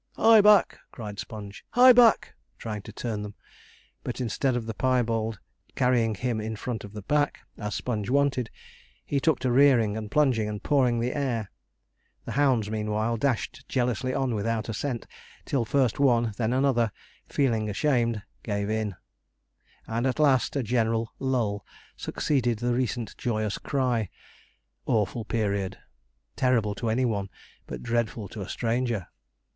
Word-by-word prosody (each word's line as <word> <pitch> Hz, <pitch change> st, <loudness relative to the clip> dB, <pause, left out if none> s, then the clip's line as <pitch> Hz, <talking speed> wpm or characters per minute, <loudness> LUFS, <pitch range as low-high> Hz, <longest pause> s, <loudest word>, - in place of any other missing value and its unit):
'Hie 225 Hz, -1 st, +7 dB
back!' 210 Hz, -2 st, +5 dB
cried 105 Hz, -3 st, -7 dB
Sponge. 105 Hz, -2 st, -8 dB
'Hie 250 Hz, +1 st, +8 dB
back!' 235 Hz, -2 st, +5 dB, 0.2 s
trying 105 Hz, -2 st, -5 dB
to 110 Hz, -, -10 dB
turn 110 Hz, -1 st, -4 dB
them; 105 Hz, 0 st, -7 dB, 0.7 s
but -, -, -4 dB
instead 125 Hz, +2 st, 0 dB
of 120 Hz, -2 st, -2 dB
the 115 Hz, -, -4 dB
piebald 115 Hz, -3 st, 0 dB, 0.4 s
carrying 120 Hz, -3 st, +2 dB
him 115 Hz, +1 st, -2 dB
in 110 Hz, +1 st, -4 dB
front 115 Hz, +2 st, -4 dB
of 100 Hz, 0 st, -10 dB
the 105 Hz, -2 st, -7 dB
pack, 145 Hz, +5 st, 0 dB, 0.2 s
as 105 Hz, -1 st, -3 dB
Sponge 110 Hz, -3 st, -3 dB
wanted, 135 Hz, -3 st, +1 dB, 0.6 s
he 140 Hz, -, 0 dB
took 155 Hz, 0 st, +2 dB
to 130 Hz, -, +1 dB
rearing, 120 Hz, -5 st, +4 dB
and 110 Hz, -1 st, -5 dB
plunging, 125 Hz, -6 st, +2 dB
and 105 Hz, -1 st, -6 dB
pawing 130 Hz, -5 st, +2 dB
the 120 Hz, +2 st, -1 dB
air. 120 Hz, -8 st, -2 dB, 0.7 s
The -, -, -5 dB
hounds 130 Hz, -7 st, +2 dB
meanwhile 110 Hz, +1 st, -1 dB
dashed 120 Hz, 0 st, -2 dB
jealously 125 Hz, 0 st, 0 dB
on 130 Hz, -2 st, 0 dB
without 115 Hz, +1 st, -1 dB
a -, -, -2 dB
scent, 125 Hz, +1 st, -3 dB, 0.4 s
till 125 Hz, -4 st, 0 dB
first 130 Hz, -2 st, +1 dB
one 120 Hz, -4 st, +4 dB
and 110 Hz, -, -3 dB
then 110 Hz, +2 st, -1 dB
another 130 Hz, -4 st, +2 dB, 0.4 s
feeling 115 Hz, -6 st, +1 dB
ashamed, 115 Hz, -3 st, +1 dB, 0.2 s
gave 100 Hz, -1 st, -2 dB
in; 110 Hz, -3 st, -1 dB, 0.9 s
and 115 Hz, +3 st, -1 dB
at 130 Hz, -, -1 dB
last 140 Hz, -4 st, +3 dB
a 140 Hz, -, 0 dB
general 115 Hz, 0 st, 0 dB
lull 115 Hz, -7 st, -1 dB, 0.3 s
succeeded 120 Hz, -6 st, 0 dB
the 120 Hz, +2 st, 0 dB
recent 120 Hz, -3 st, -2 dB
joyous 110 Hz, -3 st, -1 dB
cry. 125 Hz, -7 st, 0 dB, 0.8 s
Awful 110 Hz, +1 st, 0 dB
period! 100 Hz, -4 st, -1 dB, 0.6 s
terrible 120 Hz, -6 st, +2 dB
to 115 Hz, +3 st, -3 dB
any 125 Hz, +4 st, +1 dB
one, 100 Hz, -4 st, -1 dB, 0.4 s
but -, -, -7 dB
dreadful 115 Hz, -2 st, -1 dB
to 105 Hz, -, -7 dB
a 95 Hz, -, -6 dB
stranger! 115 Hz, -4 st, -1 dB
115 Hz, 155 wpm, -27 LUFS, 110-130 Hz, 0.9 s, Hie